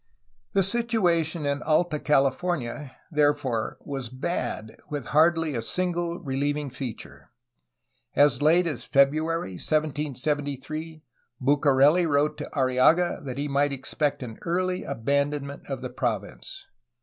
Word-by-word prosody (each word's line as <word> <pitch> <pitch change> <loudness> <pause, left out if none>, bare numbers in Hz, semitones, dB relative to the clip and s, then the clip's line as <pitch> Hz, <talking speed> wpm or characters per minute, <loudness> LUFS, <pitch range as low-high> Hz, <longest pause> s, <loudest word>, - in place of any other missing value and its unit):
The 195 - +4
situation 180 -8 +1
in 140 0 -1
Alta 155 0 +1
California, 140 -1 0 0.2
therefore, 145 -6 +1
was 135 -4 -4
bad, 130 -4 -4
with 145 -5 -4
hardly 160 0 +4
a 115 - -2
single 175 +5 -1
reheving 145 -1 -2
feature. 130 -4 -8 0.9
As 145 -1 +4
late 165 +4 +4
as 140 -8 -3
February 145 - +1
1773 150 +1 -2 0.4
Bucareli 145 +4 +4
wrote 145 0 +2
to - - -5
Arriaga 135 +6 +3
that 130 -2 -5
he 145 +1 -1
might 140 +1 +1
expect 140 +1 -2
an 115 -3 -8
early 185 +2 -1
abandonment 140 +2 -2
of 135 -2 -4
the 130 - -3
province. 125 - -4
145 Hz, 115 wpm, -26 LUFS, 135-165 Hz, 0.9 s, The